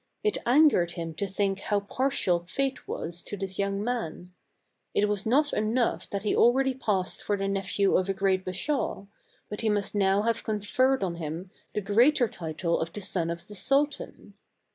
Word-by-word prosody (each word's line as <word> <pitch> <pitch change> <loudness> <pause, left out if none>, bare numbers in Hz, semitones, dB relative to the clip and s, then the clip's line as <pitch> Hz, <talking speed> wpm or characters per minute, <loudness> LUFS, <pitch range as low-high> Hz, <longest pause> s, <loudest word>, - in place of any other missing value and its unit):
It 425 -1 +1
angered 245 - +5
him 165 -1 -5
to 200 +5 -2
think 195 0 -1
how 205 0 0
partial 205 -5 +1
Fate 270 +7 -2
was 170 +1 -4
to 205 - -7
this 190 -1 -4
young 200 0 0
man. 185 -7 -4 0.6
It 210 - +3
was 205 0 -1
not 290 +5 +3
enough 215 -4 0
that 200 0 -3
he 210 - +1
already 265 +3 +4
passed 205 -8 -1
for 205 - -1
the 195 0 -1
nephew 195 0 +1
of 185 +1 +1
a - - +2
great 190 -1 +1
Bashaw, 195 - -2 0.4
but 210 - -5
he 225 - +1
must 205 -1 0
now 200 0 +2
have 230 0 0
conferred 225 +4 +1
on 170 -3 -2
him 165 +3 -5 0.2
the 210 - 0
greater 240 +7 +4
title 170 -2 -2
of 165 0 -3
the 210 - -6
son 180 -3 -1
of 170 0 -5
the 210 - -10
Sultan. 275 +8 -1
200 Hz, 185 wpm, -28 LUFS, 185-235 Hz, 0.6 s, angered